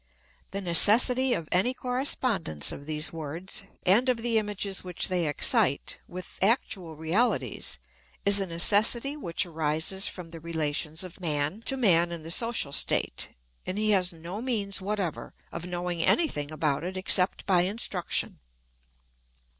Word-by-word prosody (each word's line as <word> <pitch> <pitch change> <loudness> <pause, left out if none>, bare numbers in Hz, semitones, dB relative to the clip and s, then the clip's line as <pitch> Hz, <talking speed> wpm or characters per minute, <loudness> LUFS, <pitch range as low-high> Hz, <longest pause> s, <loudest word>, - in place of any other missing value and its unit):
The 200 - -4
necessity 240 +8 +4
of 165 - -5
any 195 +8 +2
correspondence 250 - 0
of 140 - -9
these 155 0 -1
words, 165 +6 -5 0.2
and 225 +8 +4
of 250 - +2
the 230 -1 +2
images 205 -2 -3
which 180 0 -1
they 180 -3 +1
excite, 145 - +2
with 185 +1 -9
actual 190 -6 +1
realities, 160 - 0 0.5
is 200 0 +6
a 195 - -2
necessity 215 - +3
which 175 - -1
arises 160 +3 0
from 175 -3 -8
the 165 - -8
relations 160 0 -1
of 185 0 -10
man 155 +4 -1
to 270 - +2
man 175 -8 +4
in 170 -2 -6
the 165 - -4
social 230 -8 +1
state, - - 0 0.4
and 185 - -2
he 215 0 +2
has 185 -3 +2
no 170 +5 -7
means 205 -7 -1
whatever 195 -4 -3 0.2
of 175 - -6
knowing 175 -1 -2
any 330 - +3
thing 145 - -4
about 150 -1 0
it 185 +2 -4
except 185 0 +1
by 185 -3 +4
instruction. 190 -1 -1
180 Hz, 150 wpm, -28 LUFS, 165-210 Hz, 0.5 s, is